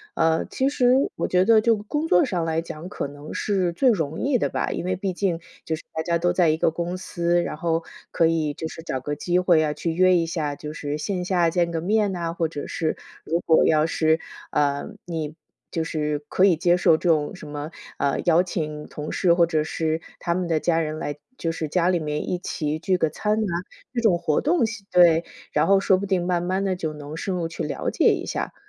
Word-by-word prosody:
呃， 160 0 +2
其 265 - 0
实 250 -3 +3 0.2
我 - - -1
觉 180 0 +4
得 225 -1 +6
就 230 0 +4
工 295 +10 -3
作 180 - +5
上 175 -3 -1
来 165 0 0
讲， 165 +1 -8
可 145 - -4
能 145 +1 -10
是 190 -4 0
最 260 +7 +3
容 160 -8 0
易 270 -2 +2
的 - - 0
吧。 - - -2
因 - - -3
为 185 0 0
毕 190 0 -2
竟 175 -3 -1 0.3
就 160 - -1
是 - - -13
大 160 - -2
家 170 -1 +1
都 175 +1 +2
在 175 -3 +3
一 155 - +2
个 - - +3
公 175 +2 -3
司， 175 -1 0
然 170 - -3
后 165 0 0 0.3
可 165 - +3
以 155 -3 0
就 160 - -5
是 165 - -9
找 130 - -3
个 145 +3 -4
机 175 +4 +1
会 175 -4 +4
啊， 150 - 0
去 165 - -2
约 185 +1 +4
一 170 - +2
下， 150 -4 -2
就 150 0 -6
是 145 -1 -4
线 185 +1 -2
下 175 -2 +2
见 170 0 +1
个 165 - -1
面 205 +2 +2
呐， 170 -2 -3
或 165 - +1
者 145 -3 -6
是 160 -2 -1 0.3
如 170 +2 0
果 160 - +4
要 155 -1 +4
是， 160 0 +2 0.3
呃， 145 -1 +1 0.2
你 160 -3 -4 0.4
就 165 - -1
是 150 -2 -2
可 190 - +4
以 180 -4 +5
接 175 +1 +3
受 165 - +5
这 175 - -1
种 155 +3 +2
什 155 - -10
么， 145 +2 -6 0.3
啊， 140 -1 +1
邀 175 0 +5
请 150 -4 -4
同 150 0 -6
事 175 -3 +3
或 170 -1 +4
者 155 -2 +1
是 160 0 -1 0.2
他 170 -1 -1
们 185 -1 -1
的 160 -2 +1
家 165 0 +1
人 155 -1 -2
来 145 0 -4 0.2
就 165 - -1
是 160 -1 -3
家 175 +3 +2
里 175 -2 +2
面 150 -1 -3
一 180 - 0
起 155 -3 -3
聚 185 +3 0
个 160 - +2
餐 210 +7 -1
啊， 215 -3 -1 0.5
这 - - +1
种 205 -7 +3
活 155 -3 +1
动 330 +3 +2 0.3
对， 170 -2 +5 0.3
然 150 +1 +3
后 195 +1 +5
说 195 -1 +3
不 200 - -3
定 185 -2 0
慢 175 -1 +1
慢 190 +2 0
地 190 -1 0
就 160 -4 -3
能 150 +1 -8
深 190 +2 -2
入 175 -2 -1
去 165 - -5
了 - - -2
解 - - +3
一 - - -4
下。 - - -3
170 Hz, 255 characters per minute, -24 LUFS, 155-185 Hz, 0.5 s, 得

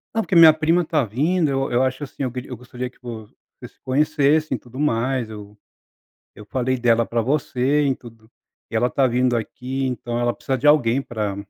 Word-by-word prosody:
Não, 225 - +2
porque 190 - -2
minha 160 -2 +9
prima 165 +3 +1
está 155 -4 0
vindo, 150 - 0
eu 135 0 -1
eu 120 +2 +2
acho, 130 +2 -2
assim, 135 - -7
eu 125 - -2
eu 125 - -7
gostaria 125 +1 -7
que - - -28
você 115 -3 -9 0.3
se - - -28
conhecessem 145 +2 +1
e - - -7
tudo 125 +3 -12
mais, 125 -3 0
eu 105 -1 -11 0.8
eu 105 - -12
falei 130 +2 -1
dela 115 -1 +2
para 115 0 -1
você 140 +1 0
e 135 - +1
tudo, 115 -3 -15 0.4
e - - -10
ela 120 +2 +2
está 135 0 +2
vindo 125 0 +1
aqui 130 +4 -4
então 120 -1 -3
ela 120 0 +1
precisa 135 - -2
de 145 - -1
alguém 135 -4 +4
para". 105 -5 -4
130 Hz, 205 wpm, -21 LUFS, 120-145 Hz, 0.8 s, minha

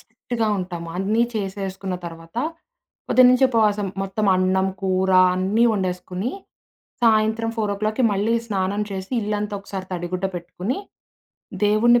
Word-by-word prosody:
స్ట్రిక్ట్‌గా 230 0 -4
ఉంటాం. 180 -2 -5
అన్నీ 210 +5 +1
చేసేసుకున్న 195 -2 -3
తర్వాత 165 +3 -11 0.7
పొద్దు 255 - +6
నుంచి 255 +1 +5
ఉపవాసం 210 -4 +2 0.2
మొత్తం 200 +2 -1
అన్నం, 185 +1 +2
కూర 190 0 +1 0.2
అన్నీ 195 +6 +2
వండేసుకొని 185 +2 -2 0.7
సాయంత్రం 220 0 +3
4:00కి 215 +3 0
మళ్లీ 205 +4 +1
స్నానం 200 -1 -1
చేసి, 190 +2 -5
ఇల్లంతా 210 0 -2
ఒకసారి 195 -1 -6
తడిగుడ్డ 180 +1 -3
పెట్టుకొని, 180 +7 -4 0.9
దేవుడిని 235 +4 +5
200 Hz, 115 wpm, -22 LUFS, 185-220 Hz, 0.9 s, పొద్దు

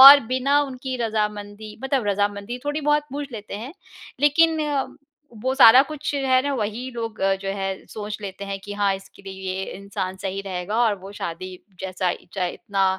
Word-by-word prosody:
और 280 +2 +13
बिना 260 +4 +3
उनकी 260 -1 -4
रज़ामंदी 210 -1 -3
मतलब 265 -5 +1
रज़ामंदी 205 +3 0
थोड़ी 290 +1 -1
बहुत 295 0 +3
पूछ 285 -1 -4
लेते 210 -3 -7
हैं। 240 +7 -7 0.5
लेक़िन 320 +3 +5 0.8
वो 260 +1 +1
सारा 255 -2 +9
कुछ 305 -2 -3
जो 285 - 0
है 255 0 +6
ना 285 - -1
वही 230 +2 -2
लोग 230 -2 -5 0.2
जो 195 - -3
है 195 0 -1 0.2
सोच 210 -1 -5
लेते 200 0 -6
हैं 195 0 -4
कि 205 - -7
हाँ 200 -1 +2
इसके 195 +1 -12
लिए 195 0 -7 0.2
ये 190 0 -2
इंसान 195 -1 -4
सही 195 0 -2
रहेगा 185 +2 -3
और 220 -3 +4
वो 195 +2 -10
शादी 185 -1 -5 0.3
जैसा 185 -1 -1 0.2
चाहे 180 -3 0
इतना 195 -1 -1
210 Hz, 180 wpm, -24 LUFS, 195-260 Hz, 0.8 s, और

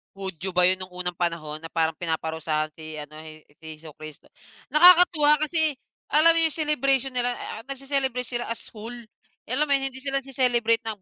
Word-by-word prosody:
Hudyo 190 -2 -6
ba 180 - +3
'yon 185 - +2
no'ng 185 -1 -8
unang 180 -1 -4
panahon 165 -3 -2
na 165 +1 -11
parang 160 -1 0
pinaparusahan 160 -2 -2
si, 155 -1 -9
ano, 150 +1 -11
He 155 0 -11 0.2
si 160 -1 -11
Hesukristo. 155 -1 -12 0.4
Nakakatuwa 315 -3 +6
kasi 315 0 +2 0.3
alam 310 +3 +5
mo - - +4
'yong 320 - 0
celebration 275 -4 +1
nila 245 -1 -1
a 225 -1 -8
nagse-celebrate 270 -2 -2
sila 240 -1 -3
as 230 - -5
whole. 225 +2 -9 0.6
Alam 270 +5 +1
mo 285 - +1
'yon, 270 -1 +1
hindi 260 - -13
sila 275 +1 -1
nagce-celebrate 245 -3 +1
ng 215 -3 -5
230 Hz, 180 wpm, -24 LUFS, 165-275 Hz, 0.6 s, Nakakatuwa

